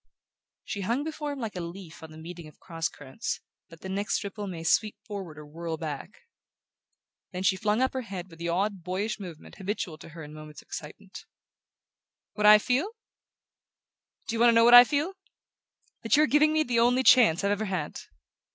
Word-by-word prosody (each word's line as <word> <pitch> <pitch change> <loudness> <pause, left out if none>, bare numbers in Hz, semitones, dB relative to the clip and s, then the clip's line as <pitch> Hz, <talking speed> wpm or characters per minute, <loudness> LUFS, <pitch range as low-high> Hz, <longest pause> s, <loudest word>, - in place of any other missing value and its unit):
She 200 - -5
hung 235 +9 0
before 305 -1 -4
him 285 - -5
like 225 -5 -5
a - - -3
leaf 170 -1 -9
on 160 - -10
the 155 - -13
meeting 170 0 -9
of 155 - -17
cross 165 -2 -3
currents, 135 -2 -5 0.3
that 165 -1 -15
the - - -7
next 200 +2 -1
ripple 205 +1 -6
may 170 -3 -6
sweep 210 +5 +2
forward 195 -7 -7
or 150 - -10
whirl 165 +2 -5
back. 155 +4 -7 1.1
Then 185 -1 -4
she 190 - +3
flung 210 +5 +1
up 260 - 0
her 260 - -2
head 190 -6 -7
with 165 -2 -16
the 170 0 -3
odd 195 +2 -1
boyish 195 +5 -2
movement 175 -6 -10
habitual 190 -5 -4
to - - -12
her 165 0 -10
in 150 0 -10
moments 155 -1 -11
of - - -39
excitement. 190 +6 -9 1.1
"What 210 0 +2
I 210 0 +10
feel? 255 - 0 1.4
Do 230 - -2
you - - -2
want 240 +1 +6
to 230 - +4
know 230 0 +6
what 240 - +6
I 245 0 +12
feel? 295 +8 -1 0.9
That 225 +4 +3
you're 305 - +6
giving 300 +1 +4
me 310 0 +2
the 245 -5 0
only 245 +2 +3
chance 215 -10 +6
I've 200 - +2
ever 205 +1 -1
had!" 185 -7 -3
195 Hz, 200 wpm, -27 LUFS, 165-230 Hz, 1.4 s, I